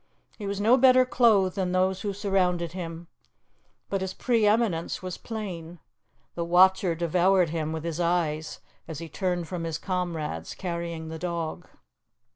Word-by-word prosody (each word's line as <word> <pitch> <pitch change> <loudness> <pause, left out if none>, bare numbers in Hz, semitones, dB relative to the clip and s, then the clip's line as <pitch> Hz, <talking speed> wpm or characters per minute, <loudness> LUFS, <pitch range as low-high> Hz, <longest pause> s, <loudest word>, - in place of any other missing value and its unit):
He 205 - -4
was 200 0 -3
no 225 +5 +5
better 255 0 +6
clothed 215 -7 +3
than 185 -2 -1
those 185 +1 +1
who 205 - -2
surrounded 185 -4 0
him, 170 -1 -7 0.8
but 195 -1 -2
his 190 0 -4
pre 230 -4 +2
eminence 205 -7 +1
was 185 -1 -5
plain. 180 -7 -6 0.6
The 170 - -3
watcher 180 0 +4
devoured 175 +1 +2
him 160 -2 -2
with 160 -1 -4
his 165 0 -3
eyes 165 -3 -1 0.3
as 160 -2 -6
he 165 +2 -6
turned 175 +1 -2
from 175 -1 -4
his 165 -1 -2
comrades, 165 - -3
carrying 170 -3 -4
the 160 0 -6
dog. 170 0 -4
180 Hz, 155 wpm, -27 LUFS, 165-195 Hz, 0.8 s, better